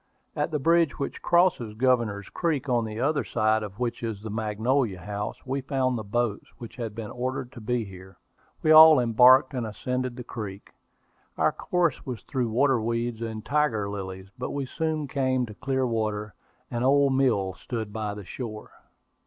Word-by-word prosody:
At -, -, 0 dB
the 155 Hz, -, -1 dB
bridge 165 Hz, +1 st, +2 dB
which 140 Hz, -, -4 dB
crosses 170 Hz, -11 st, +2 dB
Governor's 115 Hz, -5 st, +1 dB
Creek, 155 Hz, -5 st, -1 dB
on 120 Hz, -3 st, +1 dB
the 110 Hz, 0 st, -6 dB
other 145 Hz, +3 st, +1 dB
side 110 Hz, -1 st, +1 dB
of 105 Hz, -2 st, -7 dB
which 120 Hz, -1 st, -2 dB
is 115 Hz, -3 st, -3 dB
the 110 Hz, +1 st, -7 dB
Magnolia 110 Hz, +1 st, 0 dB
House, 105 Hz, +4 st, -5 dB
we 135 Hz, +1 st, -2 dB
found 130 Hz, -2 st, 0 dB
the 110 Hz, -, -4 dB
boats, 110 Hz, 0 st, -1 dB
which 120 Hz, -4 st, -10 dB
had 115 Hz, -4 st, -5 dB
been 110 Hz, -2 st, -6 dB
ordered 125 Hz, 0 st, -3 dB
to 120 Hz, -, -11 dB
be 120 Hz, +1 st, -1 dB
here. 95 Hz, -1 st, -12 dB, 0.5 s
We 155 Hz, -, +4 dB
all 155 Hz, -1 st, +10 dB
embarked, 125 Hz, +3 st, +6 dB
and 125 Hz, -2 st, -2 dB
ascended 125 Hz, +3 st, -3 dB
the 125 Hz, -, -7 dB
creek. 105 Hz, -5 st, -7 dB, 0.7 s
Our -, -, +3 dB
course 175 Hz, -5 st, 0 dB
was 120 Hz, -6 st, -6 dB
through 125 Hz, -4 st, -2 dB
water 130 Hz, +1 st, +2 dB
weeds 115 Hz, 0 st, -2 dB
and 110 Hz, -1 st, -5 dB
tiger 140 Hz, -9 st, +1 dB
lilies; 95 Hz, -1 st, -6 dB
but 125 Hz, -, -3 dB
we 140 Hz, -1 st, -3 dB
soon 155 Hz, +1 st, -2 dB
came 130 Hz, -2 st, 0 dB
to 110 Hz, -, -10 dB
clear 130 Hz, +3 st, -1 dB
water. 110 Hz, -3 st, -2 dB, 0.4 s
An 120 Hz, -, -2 dB
old 140 Hz, +1 st, +4 dB
mill 115 Hz, -8 st, +2 dB
stood 110 Hz, -2 st, -5 dB
by 105 Hz, -1 st, -3 dB
the 105 Hz, -2 st, -9 dB
shore. 110 Hz, 0 st, -7 dB
120 Hz, 180 wpm, -26 LUFS, 110-135 Hz, 0.7 s, all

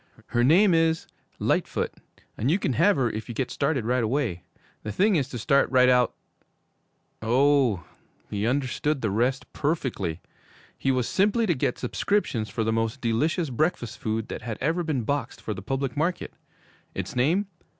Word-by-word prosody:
Her 120 Hz, -, +2 dB
name 180 Hz, +8 st, +5 dB
is 165 Hz, 0 st, +2 dB, 0.3 s
"Lightfoot," -, -, 0 dB, 0.4 s
and 120 Hz, -, -1 dB
you 170 Hz, -, +4 dB
can 140 Hz, -, -1 dB
have 185 Hz, +10 st, +4 dB
her 130 Hz, -4 st, +1 dB
if 110 Hz, +3 st, -6 dB
you 120 Hz, -, -5 dB
get 130 Hz, +2 st, -2 dB
started 140 Hz, -5 st, 0 dB
right 125 Hz, +1 st, +1 dB
away. 110 Hz, -7 st, -1 dB, 0.4 s
The 105 Hz, -, -5 dB
thing 200 Hz, -, +3 dB
is 140 Hz, -5 st, 0 dB
to 125 Hz, -, -5 dB
start 140 Hz, +5 st, +3 dB
right 125 Hz, -1 st, +5 dB
out 125 Hz, -1 st, +3 dB, 0.6 s
' -, -, -46 dB
Oh, 125 Hz, -, +3 dB, 0.4 s
he 105 Hz, +1 st, -2 dB
understood 140 Hz, +2 st, 0 dB
the 110 Hz, -, 0 dB
rest 125 Hz, +6 st, 0 dB
perfectly! 130 Hz, -, -2 dB, 0.6 s
He -, -, -2 dB
was 130 Hz, -3 st, +1 dB
simply 210 Hz, +4 st, +2 dB
to 180 Hz, -, +2 dB
get 125 Hz, -3 st, -1 dB
subscriptions 125 Hz, -, -1 dB
for 110 Hz, -, -2 dB
the 110 Hz, 0 st, 0 dB
most 115 Hz, +3 st, -1 dB
delicious 145 Hz, +7 st, 0 dB
breakfast 125 Hz, -3 st, -1 dB
food 110 Hz, 0 st, -2 dB
that -, -, -5 dB
had 110 Hz, -3 st, -5 dB
ever 165 Hz, +6 st, 0 dB
been 155 Hz, -7 st, -1 dB
boxed 140 Hz, +5 st, -2 dB
for 110 Hz, -, -4 dB
the 95 Hz, -, -7 dB
public 135 Hz, +4 st, -2 dB
market! 170 Hz, +4 st, -1 dB, 0.6 s
Its 95 Hz, +3 st, -4 dB
name? 160 Hz, +11 st, +2 dB
130 Hz, 175 wpm, -26 LUFS, 115-155 Hz, 0.6 s, name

